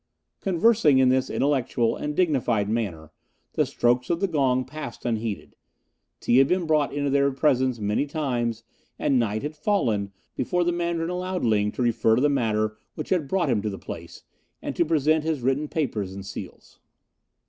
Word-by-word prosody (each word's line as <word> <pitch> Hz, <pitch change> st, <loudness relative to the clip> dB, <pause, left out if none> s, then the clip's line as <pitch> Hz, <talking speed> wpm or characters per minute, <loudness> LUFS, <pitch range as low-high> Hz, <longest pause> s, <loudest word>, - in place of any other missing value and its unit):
Conversing 195 Hz, -, +3 dB
in 130 Hz, -1 st, +5 dB
this 130 Hz, 0 st, +2 dB
intellectual 130 Hz, -4 st, +1 dB
and 150 Hz, 0 st, -4 dB
dignified 130 Hz, -, +1 dB
manner, 100 Hz, -9 st, -3 dB, 0.4 s
the -, -, +1 dB
strokes 125 Hz, +1 st, +1 dB
of 170 Hz, -1 st, +1 dB
the 195 Hz, -, +1 dB
gong 130 Hz, -6 st, +1 dB
passed 150 Hz, +1 st, -8 dB
unheeded; 115 Hz, -3 st, -3 dB, 0.6 s
tea 120 Hz, -, +2 dB
had 135 Hz, -, +5 dB
been 180 Hz, +1 st, +1 dB
brought 155 Hz, -2 st, +2 dB
into 145 Hz, -1 st, -1 dB
their 140 Hz, 0 st, +3 dB
presence 130 Hz, -2 st, +1 dB
many 105 Hz, +6 st, 0 dB
times, 120 Hz, -6 st, -2 dB, 0.3 s
and 135 Hz, -3 st, +2 dB
night 110 Hz, -2 st, -1 dB
had 150 Hz, +1 st, -4 dB
fallen 115 Hz, -, 0 dB, 0.2 s
before 180 Hz, -1 st, 0 dB
the 175 Hz, -, +1 dB
Mandarin 170 Hz, -1 st, -1 dB
allowed 180 Hz, -1 st, -2 dB
Ling 105 Hz, -2 st, +2 dB
to 125 Hz, -, -2 dB
refer 115 Hz, -1 st, +3 dB
to 125 Hz, -, +1 dB
the 145 Hz, -, +4 dB
matter 110 Hz, -5 st, 0 dB, 0.2 s
which 155 Hz, -, -6 dB
had 170 Hz, -6 st, +1 dB
brought 170 Hz, -3 st, +1 dB
him 110 Hz, -4 st, +1 dB
to 105 Hz, -, -2 dB
the 100 Hz, -, -6 dB
place, -, -, -9 dB, 0.4 s
and -, -, -5 dB
to -, -, +3 dB
present 155 Hz, 0 st, +2 dB
his 160 Hz, -4 st, -1 dB
written 135 Hz, +4 st, 0 dB
papers 105 Hz, -, -2 dB
and 100 Hz, 0 st, -7 dB
seals. 95 Hz, -, -9 dB
135 Hz, 180 wpm, -25 LUFS, 115-155 Hz, 0.6 s, in